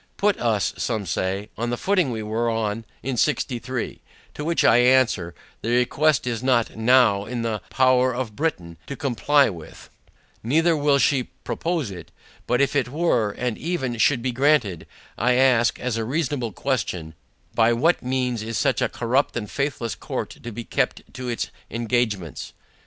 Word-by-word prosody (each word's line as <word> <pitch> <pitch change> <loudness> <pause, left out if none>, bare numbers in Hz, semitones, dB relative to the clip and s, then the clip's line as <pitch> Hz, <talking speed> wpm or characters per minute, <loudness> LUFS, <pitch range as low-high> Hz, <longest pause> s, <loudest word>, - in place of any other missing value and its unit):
Put 205 0 +2
us, 110 -4 +1
say 110 -6 -2 0.5
some, 115 - -5
on 120 - 0
the 120 - -1
footing 185 -4 +1
we 110 -3 -3
were 115 +2 -1
on 110 0 -2 0.2
in 130 0 -2
sixty 130 -2 +1
three: 120 +1 -5 0.3
To 150 - -6
which 165 +2 +1
I 115 - +6
answer, 120 -8 +3 0.3
the 115 - -3
request 125 +4 +2
is 120 -2 -2
not 125 -3 +1
NOW 110 -3 +4
in 120 +1 -4
the 110 -3 -2
power 130 0 +3
of 120 -4 -4
Britain 90 - -2
to 140 - -5
comply 140 +2 +2
with, 85 -4 -12 0.5
neither 165 +8 +2
will 145 -1 +3
she 130 -1 +2 0.2
propose 165 - -2
it; 90 -3 -9 0.4
but 125 +2 +2
if 140 0 +1
it 135 -3 +1
were, 135 -7 +1
and 125 -1 -3
even 140 -7 -2
should 120 +1 +3
be 130 - 0
granted, 125 - +1 0.3
I 125 +3 +3
ask, 125 -2 +3
as 125 -2 -2
a 115 - -1
reasonable 135 -2 -1
question, 95 - -2 0.4
By 115 0 +4
what 155 +9 +2
means 125 -2 -1
is 115 +1 -3
such - - +1
a - - +1
corrupt 125 +3 0
and 105 -3 -5
faithless 135 -5 -2
court - - -5
to 120 - -9
be 120 +2 -6
kept - - -2
to 125 0 -6
its 120 - -3 0.2
engagements? 115 -7 -2
125 Hz, 175 wpm, -23 LUFS, 115-135 Hz, 0.5 s, I